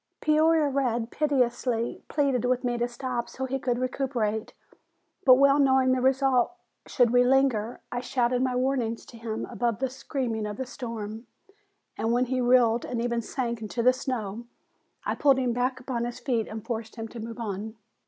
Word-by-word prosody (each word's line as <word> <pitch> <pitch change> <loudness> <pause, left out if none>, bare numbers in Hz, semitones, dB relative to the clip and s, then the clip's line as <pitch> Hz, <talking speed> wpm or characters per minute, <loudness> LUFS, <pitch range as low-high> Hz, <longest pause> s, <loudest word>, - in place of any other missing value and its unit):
Peoria 310 0 +3
Red 245 -4 -1
piteously 250 -5 0
pleaded 275 -5 +1
with 250 +1 +1
me 245 -1 0
to 240 0 0
stop 245 -1 -4
so 265 - -4
he 270 +1 -2
could 245 -2 0
recuperate, 245 -4 -1 0.7
but 255 -2 +9
well 275 +2 +5
knowing 265 -2 +4
the 255 0 +1
result 265 +1 +3 0.3
should 245 -2 +3
we 245 0 +5
linger, 250 -4 +2
I 245 - -2
shouted 245 0 0
my 255 -1 0
warnings 250 -3 -1
to 235 - -13
him 225 0 -4
above 235 -1 -1
the 265 +1 -2
screaming 245 -5 -3
of 210 0 -6
the 260 - -3
storm, 230 -3 -6 0.7
and 225 - +1
when 245 +2 +2
he 255 0 -1
reeled 240 -2 +4
and 240 - -3
even 235 0 0
sank 235 -1 -3
into 225 +2 -3
the 255 +1 +6
snow, 235 -4 -4 0.6
I - - 0
pulled 275 -3 +4
him 250 -2 0
back 250 +2 -1
upon 245 -2 -3
his 240 +1 -5
feet 240 -3 -1
and 220 -1 -7
forced 225 -2 -4
him 225 -1 -5
to 235 - -9
move 230 +1 -6
on. 215 0 -4
245 Hz, 185 wpm, -27 LUFS, 230-260 Hz, 0.7 s, but